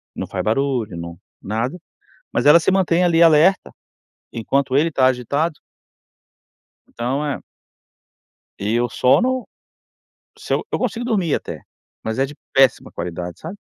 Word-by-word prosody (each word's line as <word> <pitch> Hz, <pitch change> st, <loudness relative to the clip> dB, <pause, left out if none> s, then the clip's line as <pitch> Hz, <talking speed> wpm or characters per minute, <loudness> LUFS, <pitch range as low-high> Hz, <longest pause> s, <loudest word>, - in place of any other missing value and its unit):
não -, -, -4 dB
faz -, -, -4 dB
barulho, 120 Hz, -5 st, -1 dB
não, 85 Hz, 0 st, -7 dB, 0.2 s
nada, 115 Hz, -, -3 dB, 0.5 s
mas -, -, 0 dB
ela 150 Hz, +3 st, +9 dB
se 165 Hz, -, +1 dB
mantém 180 Hz, -2 st, +2 dB
ali 170 Hz, -1 st, +4 dB
alerta, 165 Hz, +4 st, +4 dB, 0.6 s
enquanto 135 Hz, +3 st, 0 dB
ele 155 Hz, +4 st, +3 dB
está 135 Hz, -5 st, +2 dB
agitado. 140 Hz, +6 st, 0 dB, 1.4 s
Então, 130 Hz, +5 st, -1 dB
eh 140 Hz, -, -3 dB, 1.2 s
e 105 Hz, +4 st, 0 dB
o 120 Hz, -, +1 dB
sono, 250 Hz, -, +2 dB, 0.9 s
se -, -, -6 dB
eu -, -, 0 dB
eu -, -, 0 dB
consigo 240 Hz, -1 st, -2 dB
dormir 200 Hz, -10 st, 0 dB
até, -, -, -5 dB, 0.4 s
mas 110 Hz, +2 st, -3 dB
é 135 Hz, -, +2 dB
de 145 Hz, -, -11 dB, 0.2 s
péssima 135 Hz, -3 st, +3 dB
qualidade, 85 Hz, 0 st, -6 dB
sabe? 170 Hz, +6 st, -8 dB
140 Hz, 140 wpm, -20 LUFS, 115-170 Hz, 1.4 s, ela